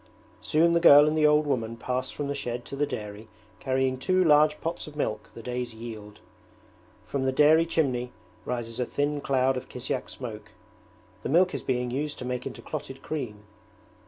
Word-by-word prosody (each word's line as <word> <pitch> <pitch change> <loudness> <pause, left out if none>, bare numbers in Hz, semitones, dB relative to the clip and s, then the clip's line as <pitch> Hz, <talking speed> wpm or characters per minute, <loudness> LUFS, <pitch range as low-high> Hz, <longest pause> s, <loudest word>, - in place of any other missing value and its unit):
Soon 170 +2 +3
the 170 - +4
girl 150 -3 +8
and 155 - +1
the 155 -1 +4
old 150 0 +4
woman 115 -5 -2
pass 130 +2 -2
from 145 - -4
the 140 - -1
shed 120 -3 -4
to - - -7
the 145 +1 0
dairy 105 +1 -6 0.3
carrying 130 0 0
two 185 +7 +2
large 150 -1 +5
pots 165 0 -4
of 150 - -11
milk, 110 -7 -3
the 115 - -9
day's 125 -1 -4
yield. 110 -2 -9 0.8
From 135 -2 -2
the 130 - +2
dairy 155 +4 +5
chimney 125 -7 0 0.3
rises 115 -1 -4
a 125 - +1
thin 145 0 -1
cloud 130 -1 +1
of 125 - -7
kisyak - - -4
smoke: - - -8 0.7
the - - -4
milk 180 +5 +4
is - - -3
being 125 -1 -1
used 145 +3 -3
to 125 - -6
make 125 0 -3
into - - -9
clotted - - -7
cream. 120 -9 -5
130 Hz, 190 wpm, -27 LUFS, 120-150 Hz, 0.8 s, girl